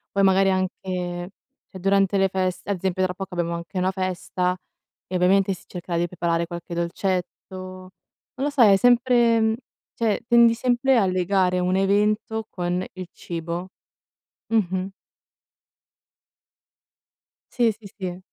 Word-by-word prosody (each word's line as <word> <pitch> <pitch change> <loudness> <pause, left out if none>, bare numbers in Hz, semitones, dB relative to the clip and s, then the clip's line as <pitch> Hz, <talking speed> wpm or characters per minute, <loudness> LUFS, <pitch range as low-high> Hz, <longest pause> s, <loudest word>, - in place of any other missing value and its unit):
Poi 200 - +3
magari 195 0 +4
anche 180 -1 -2 0.4
c'è - - -10
durante 195 +1 +2
le 195 0 +3
feste 185 -1 -2
ad 200 - -1
esempio 185 +1 -1
tra 185 -1 0
poco 190 0 -7
abbiamo 170 -1 -1
anche 170 0 -6
una 185 +1 +1
festa 185 -1 -2 0.5
e 185 - -5
ovviamente 190 +2 +3
si 180 - -12
cercherà 175 -1 -5
di 175 - +1
preparare 170 -1 -1
qualche 170 0 -7
dolcetto. 180 +2 -1 0.3
Non 185 0 -9 0.4
lo 275 +2 -1
so, 285 -3 +2
è 205 -4 +8
sempre 235 -1 +4 0.4
cioè 225 -3 +1
tendi 235 -1 +6
sempre 250 +2 +2
a 215 - +4
legare 185 0 +1
un 180 +1 +1
evento 210 +3 +1
con 180 0 -2
il 185 -1 -7
cibo. 170 +2 -5 0.8
Mh-mh. 190 -4 0 2.6
Sì, 235 -2 +2
sì, 210 -2 -13
sì. 180 -2 -5
185 Hz, 140 wpm, -24 LUFS, 180-205 Hz, 2.6 s, è